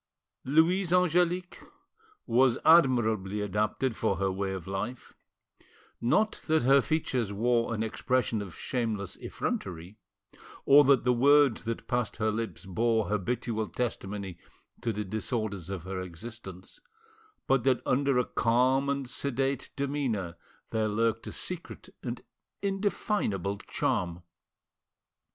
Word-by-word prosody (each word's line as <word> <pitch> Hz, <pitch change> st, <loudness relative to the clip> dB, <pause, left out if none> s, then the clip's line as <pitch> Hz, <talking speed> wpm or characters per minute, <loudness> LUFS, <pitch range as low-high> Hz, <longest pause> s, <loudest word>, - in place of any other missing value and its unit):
Louise 165 Hz, +6 st, +3 dB
Angelique 180 Hz, 0 st, +2 dB, 0.7 s
was 125 Hz, +1 st, +3 dB
admirably 110 Hz, -, +4 dB
adapted 105 Hz, +5 st, -1 dB
for 100 Hz, -, 0 dB
her 95 Hz, +1 st, 0 dB
way 95 Hz, +1 st, -2 dB
of 95 Hz, -3 st, -5 dB
life; 100 Hz, +6 st, -5 dB, 0.9 s
not 215 Hz, -, +1 dB
that 160 Hz, -3 st, +3 dB
her 135 Hz, +2 st, +6 dB
features 130 Hz, -9 st, -1 dB
wore 115 Hz, +3 st, +1 dB
an 110 Hz, -, -1 dB
expression 115 Hz, -1 st, 0 dB
of 95 Hz, -5 st, -8 dB
shameless 110 Hz, -6 st, -2 dB
effrontery, 90 Hz, +5 st, -5 dB, 0.7 s
or 145 Hz, +1 st, +8 dB
that 140 Hz, -2 st, +4 dB
the 125 Hz, 0 st, +3 dB
words 140 Hz, 0 st, +4 dB
that 115 Hz, 0 st, -4 dB
passed 125 Hz, -2 st, -1 dB
her 110 Hz, 0 st, +1 dB
lips 115 Hz, -1 st, -4 dB
bore 110 Hz, +3 st, +1 dB
habitual 110 Hz, +1 st, -1 dB
testimony 100 Hz, -3 st, -4 dB, 0.4 s
to 115 Hz, -, 0 dB
the 105 Hz, 0 st, -3 dB
disorders 105 Hz, -3 st, -3 dB
of 95 Hz, -4 st, -4 dB
her 95 Hz, 0 st, -4 dB
existence, 95 Hz, +1 st, -9 dB, 0.7 s
but 135 Hz, -3 st, +2 dB
that 130 Hz, -1 st, +3 dB
under 140 Hz, 0 st, +2 dB
a 125 Hz, -, +2 dB
calm 130 Hz, +4 st, +2 dB
and 140 Hz, -2 st, -1 dB
sedate 135 Hz, +1 st, -1 dB
demeanour 130 Hz, -11 st, -2 dB, 0.4 s
there 110 Hz, -1 st, +1 dB
lurked 115 Hz, +2 st, 0 dB
a -, -, -5 dB
secret 180 Hz, -2 st, -7 dB
and -, -, -5 dB, 0.4 s
indefinable 195 Hz, -, -1 dB
charm. 85 Hz, -1 st, -2 dB
115 Hz, 125 wpm, -29 LUFS, 100-135 Hz, 0.9 s, or